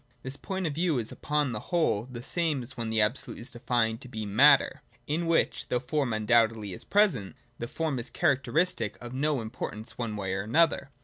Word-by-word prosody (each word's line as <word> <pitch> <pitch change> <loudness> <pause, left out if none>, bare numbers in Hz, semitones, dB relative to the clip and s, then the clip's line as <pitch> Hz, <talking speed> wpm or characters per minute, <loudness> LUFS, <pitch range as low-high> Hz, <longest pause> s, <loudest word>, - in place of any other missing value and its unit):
This 130 +1 -3
point 190 +4 -4
of 155 - -1
view 165 -1 +1
is 115 -2 0
upon 150 -3 -1
the 105 - -3
whole 160 - +1
the 120 -1 -7
same 155 -4 -1
as 125 +2 -10
when 115 -1 -3
the 110 0 +1
Absolute 120 +4 -1
is 120 +3 -7
defined 120 -2 0
to 130 - -8
be 110 -3 -5
Matter, 120 +9 +5 0.2
in 165 +3 -1
which, 165 - +1
though 125 - 0
form 135 0 -1
undoubtedly 110 -2 +2
is - - -6
present, 190 - +2 0.2
the 120 - -3
form 155 -1 -2
is 120 - -5
a - - -25
characteristic 140 - +1
of 120 0 -8
no 140 0 0
importance 110 0 -6
one 115 -3 -2
way 95 -2 -3
or 95 - -1
another. 140 +5 +2
125 Hz, 205 wpm, -28 LUFS, 110-150 Hz, 0.2 s, Matter